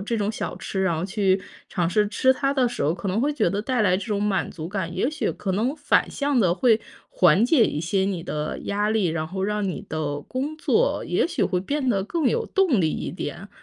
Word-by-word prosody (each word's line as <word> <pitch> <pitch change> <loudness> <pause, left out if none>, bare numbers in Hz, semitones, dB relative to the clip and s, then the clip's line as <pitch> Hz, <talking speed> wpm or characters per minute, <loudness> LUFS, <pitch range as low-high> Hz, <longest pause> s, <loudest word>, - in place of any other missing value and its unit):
这 220 +4 -2
种 205 0 0
小 220 - -4
吃， 190 - -3
然 180 -4 +1
后 160 - -2
去 195 -1 +1 0.3
尝 175 -3 0
试 210 +3 +2
吃 260 +4 +3
它 275 +1 0
的 260 -3 +2
时 235 - -4
候， 150 - +2
可 190 - -6
能 195 +4 0
会 290 +4 +1
觉 230 -10 +1
得 200 +4 -2
带 250 -1 0
来 185 -3 +3
这 195 - -5
种 205 -2 -1
满 205 -2 0
足 160 0 -7
感， 185 -3 -3
也 215 - +1
许 300 -7 -1
可 195 - -3
能 230 +9 0
反 290 - +2
向 285 -2 0
地 180 -5 +3
会 230 +1 +3 0.3
缓 180 +4 +4
解 250 -2 +5
一 150 - -3
些 175 +4 0
你 190 -4 -2
的 150 -2 -3
压 205 +1 0
力， 215 -4 +2
然 160 -1 -1
后 190 +3 -4
让 210 +1 -1
你 190 - -5
的 145 -2 -2
工 275 - -4
作 450 +9 +1
也 - - +1
许 335 - -2
会 185 -2 +1
变 280 +7 -2
得 200 -5 +2
更 305 - 0
有 470 -1 0
动 365 - +2
力 160 -3 +2
一 - - -4
点， - - -6
205 Hz, 265 characters per minute, -24 LUFS, 185-255 Hz, 0.3 s, 解